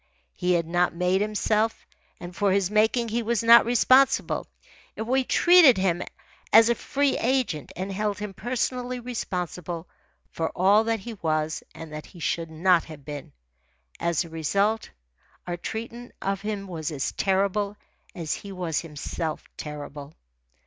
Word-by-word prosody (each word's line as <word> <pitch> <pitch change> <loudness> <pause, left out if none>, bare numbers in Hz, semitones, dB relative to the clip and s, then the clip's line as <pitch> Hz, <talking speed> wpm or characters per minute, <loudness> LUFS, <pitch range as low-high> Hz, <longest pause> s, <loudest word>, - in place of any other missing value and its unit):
He 180 0 0
had 170 -1 +1
not 175 +1 +1
made 180 +2 +1
himself, 215 +1 0 0.3
and 175 0 -9
for 200 -1 +2
his 195 0 +1
making 220 +2 +2
he 235 +2 0
was 230 0 0
not 235 +1 +8
responsible. 255 +3 +3 0.5
Yet 220 - -3
we 260 +3 +2
treated 340 - +6
him 180 -2 +1 0.5
as 225 +1 +7
a - - +5
free 280 +4 0
agent 245 - 0
and 190 +2 -4
held 205 +1 -1
him 205 -1 -5
personally 250 +4 -2
responsible 180 -8 -4 0.4
for 165 -1 -2
all 200 +4 +5
that 225 -2 0
he 235 +3 -7
was 155 -5 -1
and 160 -1 -9
that 155 0 -7
he 180 - -14
should 165 0 -2
not 170 +2 +3
have 150 -4 -12
been. 145 -2 -7 0.7
As 170 0 0
a - - -11
result, 200 +8 0 0.6
our 175 - -3
treatment 230 +6 -6
of 195 -1 -2
him 210 -1 -4
was 160 -4 -4
as 140 -3 -2
terrible 200 +1 0 0.4
as 165 -3 -3
he 200 - -7
was 175 -4 -2
himself 155 0 -5
terrible. 145 0 -8
195 Hz, 155 wpm, -26 LUFS, 165-225 Hz, 0.7 s, not